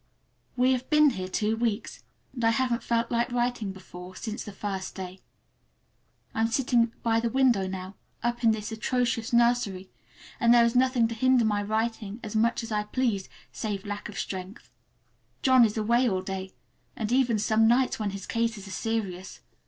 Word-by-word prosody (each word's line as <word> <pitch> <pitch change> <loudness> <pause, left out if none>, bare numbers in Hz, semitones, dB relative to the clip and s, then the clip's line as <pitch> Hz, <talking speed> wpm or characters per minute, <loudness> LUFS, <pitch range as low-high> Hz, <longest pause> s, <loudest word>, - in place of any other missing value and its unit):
We 250 +1 +4
have 255 0 -1
been 300 -2 +5
here 185 -6 -4
two 210 +3 0
weeks, 225 -2 -2 0.3
and 240 - -5
I 225 - +5
haven't 245 0 +1
felt 235 0 0
like 235 +1 0
writing 240 -4 -1
before, 185 -1 -11
since 220 +1 -5
that 210 - -8
first 195 -2 -4
day. 185 0 -7 1.1
I 225 - -1
am 225 - +3
sitting 235 -1 +2
by 225 -1 +2
the 235 0 0
window 240 -6 +3
now, 185 0 -6 0.3
up 240 0 -1
in 230 - +6
this 220 0 -1
atrocious 235 +1 -1
nursery, 235 -6 +2 0.5
and 235 -2 +4
there 235 -1 +7
is 235 +1 0
nothing 250 -2 +3
to - - -3
hinder 255 +1 +3
my 205 -1 +1
writing 220 0 -2
as 215 -1 -6
much 230 +2 +2
as 230 - -7
I 210 -1 0
please, 215 -4 -1 0.2
save 205 -2 -4
lack 205 0 -5
of 200 - -9
strength. 190 +3 -6 0.7
John 260 -2 +6
is 220 -1 +1
away 235 +3 +3
all 185 -2 -1
day, 190 0 -5 0.4
and 220 0 -3
even 250 -3 +3
some 220 +1 +3
nights 250 +2 +2
when 210 -2 -1
his 195 -1 -6
cases 230 -3 -2
are - - -8
serious. 195 -4 -3
225 Hz, 185 wpm, -27 LUFS, 205-240 Hz, 1.1 s, there